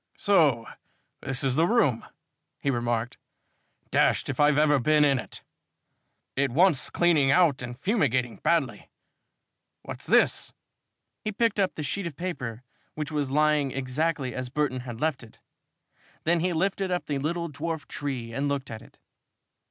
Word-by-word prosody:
"So 150 - +3 0.6
this 135 -1 -1
is 130 -2 +1
the 165 +3 +3
room," 150 - +2 0.6
he 140 - 0
remarked. 120 -1 -2 0.7
"Dashed - - +2
if 130 - -4
I've 145 0 +4
ever 150 -2 +4
been 150 +3 +4
in 140 -2 +3
it! - - -9 0.9
It 140 0 +1
wants 155 +2 +3
cleaning 160 -6 +3
out 160 -4 +4
and 120 0 -7
fumigating 130 - 0
badly. 160 -8 0 0.9
What's - - -7
this?" - - +3 0.7
He 215 - -2
picked 215 0 0
up 190 -2 +1
the 150 - -4
sheet 175 +6 -3
of 160 - -8
paper, 130 -9 -5 0.3
which 155 0 -4
was 145 -3 -1
lying 150 0 +2
exactly 135 +1 -2
as 130 -1 -5
Burton 135 -2 -1
had 120 -2 -8
left 155 -2 -1
it. 115 -2 -15 0.8
Then 170 +1 +2
he 180 +2 0
lifted 190 +3 -1
up 180 -1 -1
the 145 -2 -2
little 170 +4 -2
dwarf 160 +1 -5
tree 125 -5 -5
and 140 +4 -1
looked 140 -3 -3
at 110 -1 -7
it. - - -18
145 Hz, 155 wpm, -26 LUFS, 130-165 Hz, 0.9 s, I've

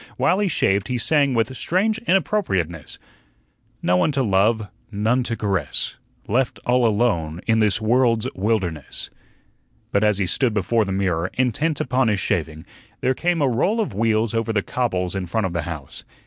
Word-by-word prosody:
While 185 - +2
he 205 - +1
shaved 100 - +1
he 125 -1 -1
sang 140 +1 +2
with 115 +3 0
strange 210 +10 0
inappropriateness: 95 - 0 0.9
"No 90 +1 +3
one 90 - +2
to 135 -1 +1
love, 105 +1 +2 0.2
none 110 +5 +1
to 115 -2 -3
Caress, 95 -7 -1 0.3
Left 125 +4 0
all 125 -1 +3
alone 100 -8 0
in 110 -1 +2
this 110 0 +2
world's 115 +1 +2
wilderness." 95 - -2 0.8
But 100 - +2
as 105 -2 +3
he 100 - 0
stood 110 - +1
before 110 +2 +1
the 95 - -4
mirror, 95 -3 0
intent 135 +5 0
upon 130 0 +1
his 105 -3 +1
shaving, 80 -5 -2 0.4
there 130 - +2
came 170 +2 0
a - - +3
roll 150 - +1
of 215 - -1
wheels 110 +1 +1
over 115 0 0
the 100 -3 0
cobbles 90 -8 -1
in 95 -2 -3
front 105 +4 -1
of 90 - -3
the 85 - -1
house. 75 -5 -7
110 Hz, 175 wpm, -22 LUFS, 95-125 Hz, 0.9 s, No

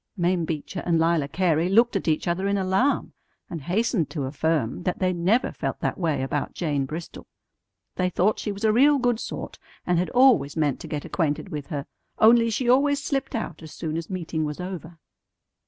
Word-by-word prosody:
Mame 175 -1 +1
Beecher 160 +3 -4
and 170 -2 +2
Lila 165 -3 +2
Cary 165 +1 +1
looked 230 +4 +4
at 195 - -2
each 155 +1 +1
other 180 +3 0
in 200 0 +1
alarm, 190 +9 +1 0.4
and 165 -3 -5
hastened 185 - 0
to 150 -5 -4
affirm 145 -1 -1
that 180 0 -2
they 185 -1 +1
never 185 +8 +1
felt - - -4
that - - -2
way 160 -6 0
about 140 +2 -3
Jane 145 -5 -1
Bristol. 160 +3 -7 0.7
They 180 0 +1
thought 190 +4 +1
she 210 - -3
was 200 +1 -7
a 215 -1 +4
real 285 +5 +5
good 245 -3 +1
sort, - - -6 0.3
and 175 -1 +2
had 180 - -1
always 245 - +4
meant 145 -4 +1
to - - -8
get 150 -1 -4
acquainted 160 +2 -1
with 150 -5 -5
her; 145 -3 -4 0.3
only 230 +1 +6
she 240 +3 -1
always 280 +3 +4
slipped 275 -2 -2
out 195 -8 -4
as 160 -2 -10
soon 155 -2 -4
as 165 0 -4
meeting 170 -4 -3
was 150 +1 -4
over. 180 -2 -7
175 Hz, 200 wpm, -25 LUFS, 155-215 Hz, 0.7 s, only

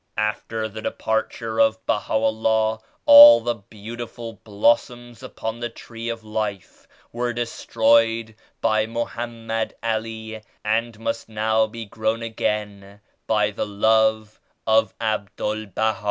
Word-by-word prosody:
After 110 +1 -2
the 110 +1 -8
departure 110 +1 -2
of 110 0 +2
Baha'u'llah 110 0 +1 0.3
all 290 0 +11
the 120 - -1
beautiful 115 +2 -9
blossoms 120 +3 0
upon 110 +1 -6
the 120 0 -3
Tree 115 0 -8
of 115 -1 -5
Life 105 -3 -5 0.2
were 120 0 -2
destroyed 115 -1 +1 0.3
by 110 -1 +2
Mo 115 +1 -2
hammed 115 -1 -4
Ali 110 -1 -3 0.2
and 115 +1 0
must 115 0 -4
now 110 0 +1
be 115 +1 -8
grown 110 +2 -2
again 105 -3 -4 0.3
by 105 -1 +2
the 105 - -3
Love 110 +1 +1 0.3
of 110 0 +3
Abdul 110 0 -2
Baha. 110 +3 -1
110 Hz, 120 wpm, -23 LUFS, 110-115 Hz, 0.3 s, all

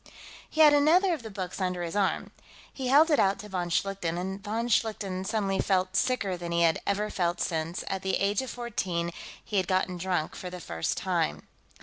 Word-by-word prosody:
He 315 - +1
had 300 -1 +8
another 340 +6 +5
of 310 - -4
the 225 - -8
books 195 -1 -5
under 180 -1 -1
his 170 +2 -4
arm. 200 -2 0 0.4
He 265 -2 -4
held 300 +5 +6
it 295 - +4
out 195 0 +3
to 210 - -9
von 180 -2 -2
Schlichten, 175 -1 -1
and 190 +2 -4
von 225 +3 -2
Schlichten 205 -5 0
suddenly 195 -2 0
felt 185 -1 +1
sicker 200 -5 +1
than 175 -1 -6
he 170 0 +2
had 165 -1 +3
ever 210 +1 0
felt 175 -1 0
since, 165 +1 -2
at 190 -1 -2
the 190 0 0
age 200 +2 +1
of 260 - -6
fourteen, 185 -8 -2 0.3
he 210 - -2
had 185 -2 +1
gotten 185 -1 0
drunk 175 -3 -1
for 180 - -6
the 180 0 -7
first 80 - -3
time. - - -1
190 Hz, 210 wpm, -28 LUFS, 180-220 Hz, 0.4 s, had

